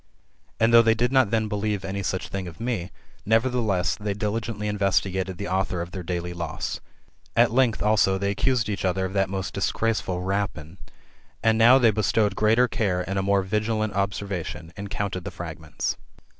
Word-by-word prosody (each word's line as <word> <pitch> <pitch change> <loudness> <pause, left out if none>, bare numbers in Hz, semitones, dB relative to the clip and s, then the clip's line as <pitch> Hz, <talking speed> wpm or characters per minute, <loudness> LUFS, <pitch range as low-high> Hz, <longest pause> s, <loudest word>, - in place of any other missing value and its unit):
And 115 +1 +3
though 115 - +9
they 115 -1 +3
did 120 +2 +1
not 130 -5 +4
then 110 0 +1
believe 105 -2 -2
any 100 +1 -3
such 95 0 -3
thing 95 -2 -4
of 85 +1 -10
me, 115 -7 -2 0.3
nevertheless, 110 -4 +1
they 105 0 -3
diligently 105 0 -3
investigated 95 -2 0
the 100 - -4
author 95 -1 -1
of 85 +1 -5
their 95 - -5
daily 90 0 -3
loss. 85 -2 -4 0.6
At - - +5
length, 125 -3 +2
also, 105 -2 +3
they 100 +1 0
accused 120 +2 +1
each 105 -1 -3
other 95 0 0
of 95 - -5
that 95 -1 +1
most 95 -2 -4
disgraceful 105 -5 -1
rapine. 95 -3 -3 0.6
And 110 -1 +4
now 120 +3 +8
they 120 -4 +5
bestowed 105 -1 +1
greater 110 +5 +4
care, 90 -7 -1
and 95 0 -1
a - - +1
more 100 0 +2
vigilant 110 +2 -1
observation, 100 -4 -3
and 100 0 -6
counted 95 -3 -3
the 100 - -4
fragments. 80 -3 -5
100 Hz, 180 wpm, -25 LUFS, 95-110 Hz, 0.6 s, though